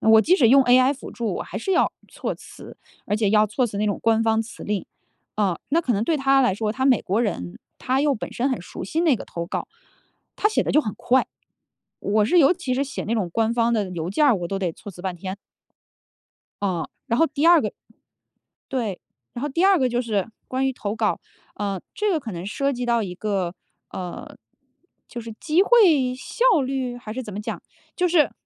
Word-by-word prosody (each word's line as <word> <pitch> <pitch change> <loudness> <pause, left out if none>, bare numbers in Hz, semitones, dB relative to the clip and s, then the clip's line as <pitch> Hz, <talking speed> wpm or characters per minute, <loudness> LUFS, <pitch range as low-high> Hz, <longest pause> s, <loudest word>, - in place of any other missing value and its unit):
我 220 0 +6
即 355 +11 +4
使 255 - +5
用 270 +3 +7
AI 255 +2 +5
辅 275 - -9
助， 230 -3 -3
我 - - -3
还 - - -8
是 390 - -1
要 365 - +3 0.2
措 - - -4
辞， - - -13 0.3
而 205 - 0
且 215 -2 +1
要 215 0 +5
措 245 +4 0
辞 205 -3 -5
那 210 - +1
种 205 - -1
官 225 0 +3
方 225 0 +2
辞 220 - -11
令。 205 -2 -2 0.5
啊， 195 -5 +1
那 330 +4 +3
可 255 -7 0
能 205 +2 0
对 320 - +1
他 270 0 +4
来 240 -7 +2
说， 215 +1 -1
他 260 +3 -2
美 255 -5 +4
国 200 +5 0
人， 90 - -3 0.2
他 260 +1 0
又 290 -2 +2
本 220 - -6
身 255 +3 0
很 255 - -2
熟 180 - -8
悉 310 - -1
那 320 -7 +3
个 - - -8
投 170 0 -5
稿， - - -4 0.7
他 425 - +2
写 - - +2
得 - - -2
就 305 - +5
很 210 - -4
快。 260 +1 +2 0.7
我 210 +1 +2
是 350 +11 +3
尤 295 0 +6
其 325 -8 -3
是 275 - 0
写 280 - -5
那 225 - -1
种 205 -6 -1
官 225 +2 +1
方 235 0 +2
的 210 -5 0
邮 170 -1 -4
件 295 +10 +2
儿， 265 - +5
我 175 - -4
都 195 - -2
得 185 -3 -1
措 205 +4 -11
辞 175 - -12
半 185 -2 -3
天。 190 +3 -6 1.3
嗯， 180 -5 -1 0.2
然 235 - 0
后 325 - +5
第 295 +2 0
二 340 -1 +7
个 - - -2 1.0
对。 225 -8 -2 0.3
然 240 - -6
后 290 - -1
第 330 +6 +1
二 390 -1 +5
个 260 - +2
就 245 0 0
是 215 -4 -1 0.2
关 260 +1 0
于 265 - 0
投 210 -4 -4
稿， 220 -2 0 0.3
呃， 200 -3 -3
这 420 0 0
个 335 - +2
可 230 -6 -7
能 175 0 -6
涉 275 +8 -1
及 250 -1 -3
到 235 -1 +2
一 190 -5 -4
个， 190 -3 -2 0.4
呃， 180 -2 -7 0.7
就 240 - -7
是 230 0 -8
机 330 +4 +3
会 335 - +5
效 450 - +2
率 260 -2 -2
还 225 -3 -8
是 260 - -4
怎 215 -4 -8
么 200 - -4
讲？ 210 - -5 0.3
就 360 -1 +1
是 325 -4 +3
235 Hz, 245 characters per minute, -23 LUFS, 205-275 Hz, 1.3 s, 用